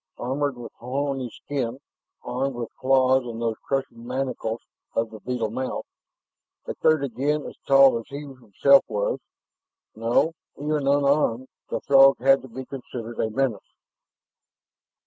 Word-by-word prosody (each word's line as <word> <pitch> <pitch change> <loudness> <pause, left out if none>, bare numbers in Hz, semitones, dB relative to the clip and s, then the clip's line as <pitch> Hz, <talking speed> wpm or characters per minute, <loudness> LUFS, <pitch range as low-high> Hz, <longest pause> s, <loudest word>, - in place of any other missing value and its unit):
Armored 135 +2 -2
with 120 -1 -8
horny 135 0 -2
skin, 130 -1 -4 0.4
armed 130 +1 -2
with 120 -2 -5
claws 130 0 +3
and 115 -1 -6
those 115 -1 -1
crushing 135 -4 -3
mandibles 125 -3 -2 0.4
of 115 0 0
the 110 - -9
beetle 115 -2 -2
mouth... 130 +3 -3 0.8
a - - -3
third 155 -2 +2
again 140 +4 -1
as - - -8
tall 135 -3 +6
as 115 - -11
he 140 +1 -6
himself 135 0 +3
was. 105 -2 -1 0.8
No, 120 +8 +2 0.2
even 150 -1 -1
unarmed, 140 -3 +2 0.2
the - - -2
Throg 135 0 +6
had 135 +2 +4
to 130 - -11
be 130 +2 -8
considered 120 -3 -7
a 110 - +1
menace. 130 -1 -2
130 Hz, 140 wpm, -25 LUFS, 115-140 Hz, 0.8 s, tall